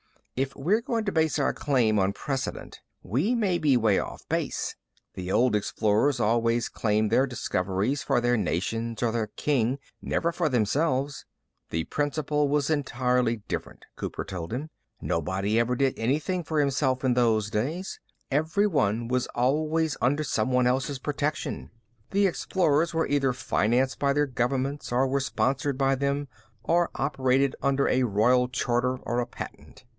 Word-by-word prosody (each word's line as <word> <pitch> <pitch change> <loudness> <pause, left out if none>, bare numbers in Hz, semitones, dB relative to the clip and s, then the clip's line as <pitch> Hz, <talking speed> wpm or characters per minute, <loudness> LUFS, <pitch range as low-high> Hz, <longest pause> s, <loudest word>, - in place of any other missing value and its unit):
If 135 +1 -2
we're 185 +11 +1
going 230 -2 -2
to 200 - 0
base 160 -3 +1
our 140 - +1
claim 120 -7 +2
on 95 +1 +1
precedent, 135 +2 -4 0.2
we 145 - 0
may 195 -7 +1
be 140 -4 +4
way 110 -4 +3
off - - -7
base. - - -2 0.4
The 90 0 -5
old 115 +1 +3
explorers 110 +6 +1
always 115 +1 +1
claimed 105 -1 0
their 135 - +4
discoveries 105 +1 -1
for 135 -2 +1
their 120 0 +2
nations 115 +4 -2
or 115 - +2
their 110 -1 -1
king, 130 +1 0 0.2
never 170 - 0
for 165 -2 0
themselves." 135 +4 0 0.4
"The 80 0 -1
principle 150 - 0
was 145 +1 +1
entirely 125 -5 0
different," - - -5
Cooper - - -5
told 85 -1 -6
him. 145 +7 -4 0.3
"Nobody 95 +7 0
ever 120 +2 +1
did 135 +1 +2
anything 155 +10 0
for 155 0 -1
himself 135 -2 +1
in 130 -2 +3
those 110 -4 +2
days. 155 - -2 0.3
Everyone 145 - +1
was 125 0 0
always 155 +5 +1
under 145 +5 +2
someone 125 -1 +1
else's 135 +3 0
protection. 145 - -3 0.4
The 200 +1 +2
explorers 170 -3 +1
either 140 -1 +1
were 130 - +1
financed 125 +1 +1
by 140 -1 +2
their 145 +1 +2
governments 135 +2 -2
or 125 +2 +3
were 135 +1 +1
sponsored 135 0 0
by 135 0 +2
them 140 +1 -1 0.4
or 170 0 +2
operated 135 -1 +1
under 140 0 +2
a 130 - +2
royal 125 +2 +3
charter 125 0 0
or 120 - -1
a 120 - -1
patent. - - -10
130 Hz, 155 wpm, -27 LUFS, 115-145 Hz, 0.4 s, be